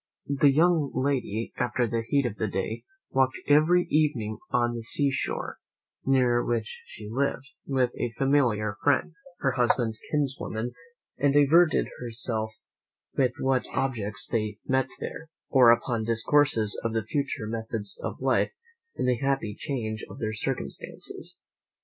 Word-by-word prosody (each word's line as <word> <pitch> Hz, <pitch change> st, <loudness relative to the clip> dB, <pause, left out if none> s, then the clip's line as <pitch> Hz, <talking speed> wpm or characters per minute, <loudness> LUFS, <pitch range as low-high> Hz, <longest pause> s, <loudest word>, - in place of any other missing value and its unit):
The 145 Hz, -, +8 dB
young 160 Hz, 0 st, +3 dB
lady, 130 Hz, -4 st, -1 dB
after 120 Hz, +1 st, +1 dB
the 115 Hz, +1 st, -1 dB
heat 140 Hz, +4 st, +1 dB
of 110 Hz, -4 st, -3 dB
the 110 Hz, -, 0 dB
day, 100 Hz, +3 st, -3 dB, 0.3 s
walked 130 Hz, -1 st, +2 dB
every 155 Hz, +5 st, +5 dB
evening 130 Hz, -9 st, +1 dB
on 120 Hz, -1 st, +1 dB
the 120 Hz, -, -4 dB
sea 140 Hz, +5 st, +1 dB
shore, -, -, -3 dB, 0.4 s
near 125 Hz, -3 st, +3 dB
which 115 Hz, -5 st, -2 dB
she 105 Hz, +4 st, -10 dB
lived, 135 Hz, +3 st, -1 dB, 0.2 s
with 130 Hz, -3 st, +2 dB
a 120 Hz, -, -1 dB
familiar 120 Hz, -7 st, +2 dB
friend, 145 Hz, +4 st, +2 dB, 0.3 s
her 135 Hz, -, +2 dB
husband's 120 Hz, -3 st, +1 dB
kinswoman, 135 Hz, -5 st, -1 dB, 0.5 s
and 140 Hz, -1 st, +3 dB
diverted 155 Hz, +4 st, +5 dB
herself 115 Hz, -2 st, -2 dB, 0.6 s
with 130 Hz, -2 st, +2 dB
what 130 Hz, -1 st, +1 dB
objects 110 Hz, -7 st, -1 dB
they 105 Hz, -2 st, -1 dB
met 130 Hz, 0 st, +1 dB
there, 160 Hz, -, -6 dB, 0.2 s
or 130 Hz, -3 st, +7 dB
upon 120 Hz, -1 st, +3 dB
discourses 115 Hz, 0 st, +2 dB
of 115 Hz, -1 st, -1 dB
the 115 Hz, -1 st, 0 dB
future 135 Hz, 0 st, -2 dB
methods 110 Hz, -1 st, -4 dB
of -, -, -4 dB
life, -, -, +2 dB, 0.4 s
in -, -, -1 dB
the 125 Hz, -1 st, +2 dB
happy 135 Hz, -6 st, 0 dB
change 110 Hz, -3 st, -3 dB
of -, -, -10 dB
their 110 Hz, -1 st, -2 dB
circumstances. 105 Hz, -, -4 dB
125 Hz, 145 wpm, -27 LUFS, 110-140 Hz, 0.6 s, The